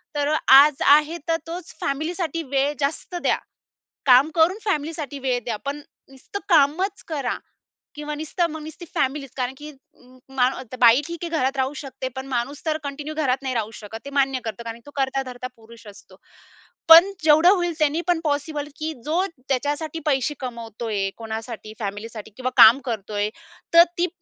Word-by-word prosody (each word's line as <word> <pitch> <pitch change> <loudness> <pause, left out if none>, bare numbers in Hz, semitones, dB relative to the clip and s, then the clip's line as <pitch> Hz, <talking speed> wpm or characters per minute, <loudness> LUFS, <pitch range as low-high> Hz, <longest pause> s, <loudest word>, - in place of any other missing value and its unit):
तर 290 0 0
अ, - - +3 0.2
आज 285 +1 +7
आहे 305 +3 0
तर 325 - +3
तोच 345 +1 -7
फॅमिलीसाठी 330 +3 -2
वेळ 280 +2 +2
जास्त 295 +5 -3
द्या. - - +2 0.7
काम 260 +3 +6
करून 335 +5 +4
फॅमिलीसाठी 305 -6 -2
वेळ 255 -2 0
द्या. 225 -3 -2
पण 285 +1 -3 0.3
नुसतं 270 +9 -8
कामच 340 +6 +2
करा 280 -6 -2 0.6
किंवा 300 0 -5
नुसतं 325 +3 -1
मग 315 0 -7
नुसती 315 +3 -9
फॅमिलीच 275 0 -1
कारण, 255 0 -2
की 300 +1 -9
अ, - - -18 0.6
म 255 -1 +3 0.3
बाई 235 +3 +7
ठीक 340 0 -7
आहे 340 - -3
घरात 265 +2 0
राहू 265 +2 0
शकते. 265 -1 -6
पण 265 0 -6
माणूस 270 +4 -3
तर 310 -1 0
कंटिन्यू 290 +2 -6
घरात 270 -4 +1
नाही 260 -2 -2
राहू 220 -1 -2
शकत, 210 +2 -8
ते - - -6
मान्य 270 -1 +1
करतो. 225 +1 -5
कारण 230 0 -6
तो 290 - -12
कर्ता-धर्ता 265 -2 -2
पुरुष 230 0 -16
असतो. 205 - -14 0.7
पण 335 +5 +10
जेवढं 315 +3 +6
होईल 350 -3 +2
त्यांनी 305 +2 +2
पण 350 -2 +2
पॉसिबल, 290 0 -2
की 315 +1 -3
जो 340 +5 +1
ज्याच्यासाठी 290 +1 -3
पैसे 280 0 +1
कमवतोय, 225 -5 -4
कोणासाठी 220 -1 -7
फॅमिलीसाठी 210 +1 -6
किंवा 255 0 -2
काम 230 +5 +9
करतोय 210 -2 -2 0.4
तर 335 0 +10
ती 355 +1 +2
280 Hz, 170 wpm, -23 LUFS, 245-315 Hz, 0.7 s, पण